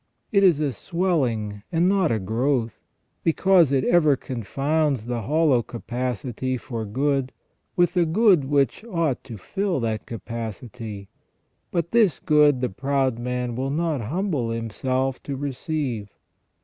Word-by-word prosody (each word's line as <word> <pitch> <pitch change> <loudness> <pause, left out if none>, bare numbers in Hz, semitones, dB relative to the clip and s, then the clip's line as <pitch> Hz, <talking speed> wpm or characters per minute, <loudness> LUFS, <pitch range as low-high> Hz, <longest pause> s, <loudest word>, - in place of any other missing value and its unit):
It 200 -3 +4
is 175 -6 +5
a 150 -3 0
swelling 125 - -1
and 170 +1 +3
not 190 -5 +3
a 115 - +2
growth, 115 +4 -1 0.4
because 170 -2 +4
it 135 -2 +2
ever 155 -5 +4
confounds 135 +2 -1
the 120 -1 -2
hollow 145 0 +3
capacity 125 +2 -3
for 115 -2 -5
good 135 +4 0 0.4
with 175 -1 +3
the 175 -2 +2
good 185 -4 +4
which 140 - +1
ought 165 - -1
to 115 -4 -8
fill 190 - -2
that 110 -2 -2
capacity, 115 -2 -6 0.6
but 170 -1 -2
this 220 - +4
good 150 -4 +4
the 125 - 0
proud 135 +2 0
man 125 0 -2
will 130 +2 -2
not 155 -2 0
humble 145 - -1
himself 130 +4 -2
to 140 - -5
receive. 135 -5 -3
135 Hz, 135 wpm, -24 LUFS, 115-160 Hz, 0.6 s, is